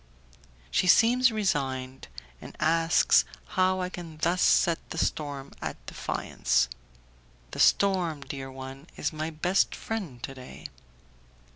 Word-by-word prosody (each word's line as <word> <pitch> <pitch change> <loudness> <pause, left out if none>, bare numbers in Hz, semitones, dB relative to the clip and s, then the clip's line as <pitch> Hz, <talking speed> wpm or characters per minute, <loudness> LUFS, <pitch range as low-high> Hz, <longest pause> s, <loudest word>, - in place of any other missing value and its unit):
She 185 - +2
seems 245 +5 +5
resigned, 135 -11 -2 0.3
and - - -11
asks 165 +1 +4 0.3
how 185 0 +2
I 180 - -2
can 170 -3 -9
thus 170 +3 +1
set 170 -1 +4
the - - -6
storm 145 -4 -2
at - - -6
defiance. - - 0 0.8
"The - - -7
storm, 180 -7 +3
dear 135 -1 -7
one, 135 +3 -9
is 150 - -2
my 155 +1 -3
best 175 +5 +1
friend 175 - -5
to 135 - -5
day." 130 -1 -12
160 Hz, 125 wpm, -28 LUFS, 135-185 Hz, 0.8 s, seems